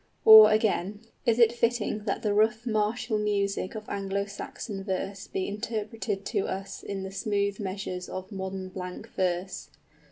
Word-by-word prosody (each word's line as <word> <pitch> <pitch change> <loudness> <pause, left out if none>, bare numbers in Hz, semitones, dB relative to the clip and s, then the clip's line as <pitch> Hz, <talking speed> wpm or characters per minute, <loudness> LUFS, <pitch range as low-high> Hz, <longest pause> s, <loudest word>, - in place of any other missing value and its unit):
Or, 220 -1 +11
again, 210 -2 +1 0.3
is 230 -1 +4
it 235 -2 +6
fitting 235 -3 -1
that 200 - -2
the 210 -2 +1
rough 220 +2 +2
martial 220 +1 0
music 200 -1 -1
of 215 0 -7
Anglo 200 0 -2
Saxon 200 0 -7
verse 195 0 -4
be 190 - -3
interpreted 210 -1 -4
to 205 -4 -1
us 195 +1 -5
in 195 -1 -5
the 190 - -6
smooth 200 -1 -1
measures 190 -2 -4
of 185 +2 -6
modern 190 -1 -5
blank 180 -1 -7
verse? 185 0 -2
200 Hz, 155 wpm, -28 LUFS, 195-215 Hz, 0.3 s, Or